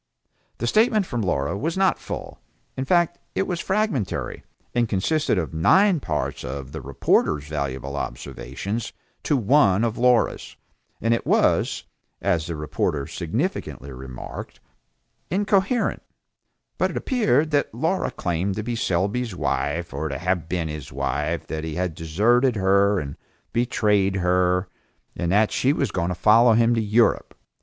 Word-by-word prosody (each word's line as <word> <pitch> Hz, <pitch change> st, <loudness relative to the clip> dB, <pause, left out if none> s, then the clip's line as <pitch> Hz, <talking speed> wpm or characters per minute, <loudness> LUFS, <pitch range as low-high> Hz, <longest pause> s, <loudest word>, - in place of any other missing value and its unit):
The 120 Hz, -, -3 dB
statement 215 Hz, -, +3 dB
from 120 Hz, -8 st, -3 dB
Laura 70 Hz, -5 st, 0 dB
was 165 Hz, -, -2 dB
not 190 Hz, -1 st, +2 dB
full, -, -, -7 dB, 0.4 s
in 130 Hz, -, -3 dB
fact 175 Hz, +2 st, +2 dB, 0.2 s
it 195 Hz, -, +1 dB
was 175 Hz, -2 st, -3 dB
fragmentary, 195 Hz, -, -1 dB, 0.3 s
and 120 Hz, -2 st, +1 dB
consisted 145 Hz, +7 st, +1 dB
of 85 Hz, -2 st, -2 dB
nine 185 Hz, -, +4 dB
parts -, -, -3 dB
of, 65 Hz, +1 st, -6 dB
the 80 Hz, -, -6 dB
reporter's 70 Hz, +2 st, +1 dB
valuable 70 Hz, -2 st, -3 dB
observations 70 Hz, -, -5 dB, 0.3 s
to 145 Hz, -, +1 dB
one 110 Hz, -4 st, +4 dB
of 115 Hz, -1 st, -1 dB
Laura's, 125 Hz, -1 st, +2 dB, 0.5 s
and 115 Hz, +2 st, +2 dB
it 115 Hz, -, -2 dB
was, -, -, +2 dB, 0.4 s
as 85 Hz, -1 st, 0 dB
the 85 Hz, -, -3 dB
reporter 75 Hz, -1 st, -2 dB
significantly 80 Hz, -, -3 dB
remarked, 65 Hz, -1 st, -8 dB, 0.7 s
"incoherent", 200 Hz, +4 st, +1 dB, 0.8 s
but -, -, +2 dB
it -, -, -5 dB
appeared 210 Hz, -, +1 dB
that 145 Hz, -1 st, +1 dB
Laura 160 Hz, -, 0 dB
claimed 90 Hz, +3 st, -2 dB
to 110 Hz, -, -3 dB
be 120 Hz, +1 st, -3 dB
Selby's 100 Hz, +3 st, -1 dB
wife, 85 Hz, -1 st, -2 dB
or 75 Hz, +3 st, -3 dB
to 70 Hz, -, -3 dB
have 90 Hz, -2 st, -1 dB
been 85 Hz, -2 st, -1 dB
his 75 Hz, -3 st, -7 dB
wife, 75 Hz, +5 st, -2 dB
that 80 Hz, -1 st, -4 dB
he 80 Hz, -1 st, -4 dB
had 90 Hz, -1 st, -1 dB
deserted 115 Hz, -, +2 dB
her 100 Hz, 0 st, +3 dB
and 70 Hz, -3 st, -6 dB, 0.4 s
betrayed 105 Hz, -5 st, +2 dB
her, 90 Hz, 0 st, +2 dB, 0.5 s
and 85 Hz, -1 st, -1 dB
that 105 Hz, +2 st, +3 dB
she 130 Hz, -, +2 dB
was 140 Hz, -6 st, 0 dB
going 90 Hz, -3 st, -1 dB
to 90 Hz, -, -2 dB
follow 115 Hz, +4 st, +5 dB
him 115 Hz, +1 st, +4 dB
to 115 Hz, -, +1 dB
Europe. 110 Hz, +2 st, +2 dB
100 Hz, 150 wpm, -23 LUFS, 80-125 Hz, 0.8 s, follow